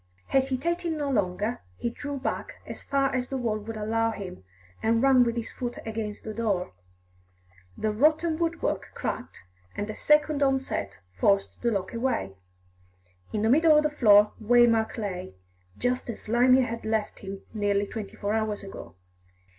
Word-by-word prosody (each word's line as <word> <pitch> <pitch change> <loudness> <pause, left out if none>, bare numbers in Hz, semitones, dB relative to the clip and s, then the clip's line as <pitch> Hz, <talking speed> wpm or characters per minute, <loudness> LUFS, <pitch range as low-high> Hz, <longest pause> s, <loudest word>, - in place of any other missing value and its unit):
Hesitating 315 +6 0
no 290 -2 -1
longer, 205 +1 -1 0.2
he 235 - -2
drew 285 +3 -5
back 265 - -3
as - - -8
far 275 -1 0
as 250 -1 -1
the 270 - -2
wall 225 -4 -1
would 220 +1 -7
allow 225 +2 +1
him, 195 - -7 0.4
and 230 +2 +2
ran 265 -2 +6
with 235 -1 0
his 235 -1 -4
foot 245 -1 -5
against 220 -2 -4
the 215 - -5
door. 205 - -1 1.0
The 215 - 0
rotten 310 +7 +2
woodwork 335 0 -1
cracked, 250 - -5 0.3
and 205 - -3
a - - -8
second 300 -1 +3
onset 265 - 0 0.2
forced 195 - +1
the 240 - +2
lock 200 -2 -2
away. 235 - -1 1.0
In 210 - -1
the 220 - +3
middle 310 +2 +6
of 300 - +4
the 300 - +1
floor 210 -7 +6
Waymark 235 0 +4
lay, 185 - -4 0.4
just 250 0 -1
as 230 - -5
Slimy 250 +3 +4
had 230 -2 -3
left 220 -1 -1
him 195 0 -8
nearly 205 -1 +1
twenty 210 -1 -7
four 205 +1 -2
hours 215 -2 -1
ago. 140 - -9
230 Hz, 160 wpm, -27 LUFS, 210-265 Hz, 1.0 s, ran